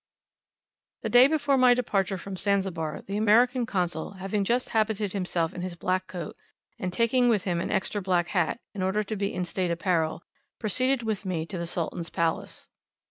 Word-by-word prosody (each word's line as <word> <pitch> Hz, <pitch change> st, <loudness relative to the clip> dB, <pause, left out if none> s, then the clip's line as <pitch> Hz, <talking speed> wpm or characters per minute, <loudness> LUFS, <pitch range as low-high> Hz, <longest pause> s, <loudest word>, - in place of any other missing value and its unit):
The -, -, -1 dB
day 245 Hz, +2 st, +8 dB
before 285 Hz, -3 st, +2 dB
my 250 Hz, -1 st, +6 dB
departure 200 Hz, -5 st, 0 dB
from 195 Hz, +1 st, -7 dB
Zanzibar 185 Hz, -6 st, -1 dB
the 200 Hz, +1 st, -4 dB
American 235 Hz, +3 st, +4 dB
Consul, 175 Hz, -4 st, -2 dB
having 195 Hz, +2 st, -2 dB
just 240 Hz, +5 st, 0 dB
habited 215 Hz, -3 st, 0 dB
himself 180 Hz, -4 st, -1 dB
in 180 Hz, -, -6 dB
his 180 Hz, -1 st, -4 dB
black 185 Hz, +2 st, -1 dB
coat, 175 Hz, -4 st, -6 dB, 0.4 s
and 185 Hz, -, -2 dB
taking 240 Hz, +5 st, +3 dB
with 210 Hz, -5 st, +2 dB
him 175 Hz, -4 st, -1 dB
an -, -, -3 dB
extra 205 Hz, +2 st, -1 dB
black 180 Hz, -2 st, +1 dB
hat, 180 Hz, +5 st, 0 dB
in 200 Hz, -, -5 dB
order 190 Hz, +3 st, +1 dB
to 215 Hz, +2 st, -4 dB
be 200 Hz, 0 st, -1 dB
in 180 Hz, 0 st, -2 dB
state 180 Hz, +1 st, -1 dB
apparel, 170 Hz, -2 st, 0 dB, 0.3 s
proceeded 255 Hz, +4 st, +1 dB
with 215 Hz, -2 st, -2 dB
me 175 Hz, -4 st, -2 dB
to 185 Hz, +2 st, -6 dB
the 170 Hz, -, -3 dB
Sultan's 170 Hz, 0 st, -3 dB
palace. 165 Hz, -1 st, -2 dB
195 Hz, 185 wpm, -27 LUFS, 175-220 Hz, 0.4 s, day